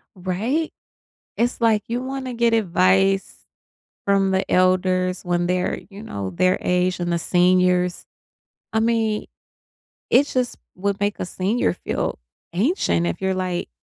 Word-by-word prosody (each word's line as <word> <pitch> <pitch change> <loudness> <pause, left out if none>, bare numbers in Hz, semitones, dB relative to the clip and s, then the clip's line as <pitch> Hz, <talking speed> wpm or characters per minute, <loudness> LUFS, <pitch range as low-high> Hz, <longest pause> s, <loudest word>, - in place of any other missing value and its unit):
Right? 205 - -1 0.7
It's 240 0 0
like 220 -2 +3
you 240 +2 -2
wanna 260 -1 -4
get 235 0 +2
advice 195 -1 +2 0.7
from 195 -1 +2
the 190 0 0
elders 185 0 +2
when 175 0 0
they're, 180 0 0
you 200 +1 -10
know, 100 - -5
their 185 - +2
age 180 0 +1
and 175 0 -1
the 170 - +1
seniors. 180 0 +2 0.7
I 220 - +2
mean, 225 -2 +1 0.8
it 285 - +5
just 250 -3 -1 0.2
would 200 +1 -2
make 205 0 -1
a - - -2
senior 185 - 0
feel - - -3 0.4
ancient 195 - +1
if 175 - -3
you're, 190 0 0
like, 180 - -2
190 Hz, 140 wpm, -22 LUFS, 180-225 Hz, 0.8 s, it